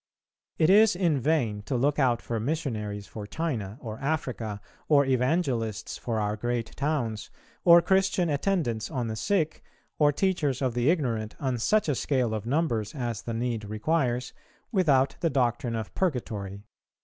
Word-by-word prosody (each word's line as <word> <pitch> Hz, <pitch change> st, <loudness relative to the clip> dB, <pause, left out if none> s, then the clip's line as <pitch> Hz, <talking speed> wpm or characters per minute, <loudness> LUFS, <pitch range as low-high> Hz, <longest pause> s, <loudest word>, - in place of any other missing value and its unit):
It 160 Hz, +3 st, +4 dB
is 210 Hz, 0 st, +6 dB
in 170 Hz, -6 st, +2 dB
vain 120 Hz, -7 st, +1 dB
to 130 Hz, -, -1 dB
look 140 Hz, +4 st, +1 dB
out 125 Hz, -4 st, +2 dB
for 115 Hz, -1 st, -2 dB
missionaries 110 Hz, -7 st, -3 dB
for 105 Hz, -1 st, -8 dB
China 115 Hz, -10 st, -3 dB
or 110 Hz, -4 st, -7 dB
Africa, 130 Hz, -8 st, -2 dB, 0.3 s
or 140 Hz, -2 st, +5 dB
evangelists 125 Hz, -, 0 dB
for 115 Hz, -2 st, -2 dB
our 105 Hz, 0 st, 0 dB
great 120 Hz, +1 st, -3 dB
towns, 135 Hz, -8 st, -2 dB, 0.3 s
or 170 Hz, -1 st, +8 dB
Christian 190 Hz, -1 st, +2 dB
attendants 145 Hz, -, 0 dB
on 125 Hz, -6 st, -2 dB
the 110 Hz, -, -3 dB
sick, 165 Hz, -, 0 dB, 0.4 s
or 145 Hz, -1 st, +5 dB
teachers 145 Hz, -5 st, 0 dB
of 130 Hz, -3 st, 0 dB
the 120 Hz, +4 st, +2 dB
ignorant, 120 Hz, -10 st, 0 dB
on 130 Hz, -3 st, -1 dB
such 210 Hz, -, +2 dB
a 150 Hz, -, +2 dB
scale 125 Hz, -3 st, 0 dB
of 110 Hz, 0 st, -4 dB
numbers 120 Hz, -7 st, 0 dB
as 120 Hz, -5 st, -3 dB
the 115 Hz, -, -4 dB
need 115 Hz, -2 st, -2 dB
requires, 125 Hz, +3 st, -1 dB, 0.4 s
without 145 Hz, -, +3 dB
the 165 Hz, -, +1 dB
doctrine 120 Hz, -3 st, 0 dB
of 110 Hz, -2 st, -5 dB
Purgatory. 105 Hz, -, -2 dB
125 Hz, 160 wpm, -27 LUFS, 110-155 Hz, 0.4 s, or